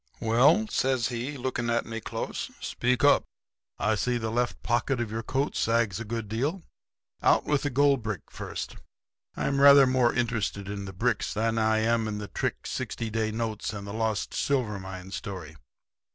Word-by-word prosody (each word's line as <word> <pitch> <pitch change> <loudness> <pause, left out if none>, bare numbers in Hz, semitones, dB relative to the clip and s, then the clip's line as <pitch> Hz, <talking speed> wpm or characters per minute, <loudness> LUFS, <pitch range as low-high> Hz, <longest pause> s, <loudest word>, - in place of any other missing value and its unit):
"'Well,' 125 - +4
says 130 - +1
he, 125 +4 -4
looking 125 -2 -2
at 115 0 +1
me 115 -1 -5
close, 115 +1 -4
'speak 125 0 0
up. - - +6 0.5
I 105 - +1
see 120 +4 0
the 110 -1 -3
left 120 +1 -1
pocket 120 +2 +1
of 115 -3 -2
your 115 +1 -2
coat 135 +5 -1
sags 115 -3 +1
a - - -4
good 115 -1 -4
deal. 140 - -2 0.6
Out - - +4
with 145 -2 +1
the 145 - -1
goldbrick 130 -7 +1
first. - - -6 0.6
I'm 140 0 0
rather 140 -1 +9
more 130 -2 +3
interested 115 -5 -1
in 100 -1 -4
the 95 - -6
bricks 110 +3 0
than 115 +1 +1
I 110 0 +2
am 115 0 +1
in 105 -1 -3
the 105 0 -5
trick - - -3
sixty 115 -1 -4
day 110 0 0
notes 110 -1 -3
and 100 -1 -6
the 100 - -6
lost 110 -2 -1
silver 120 -8 0
mine 95 0 -8
story.' 95 -6 -6
115 Hz, 180 wpm, -27 LUFS, 110-125 Hz, 0.6 s, rather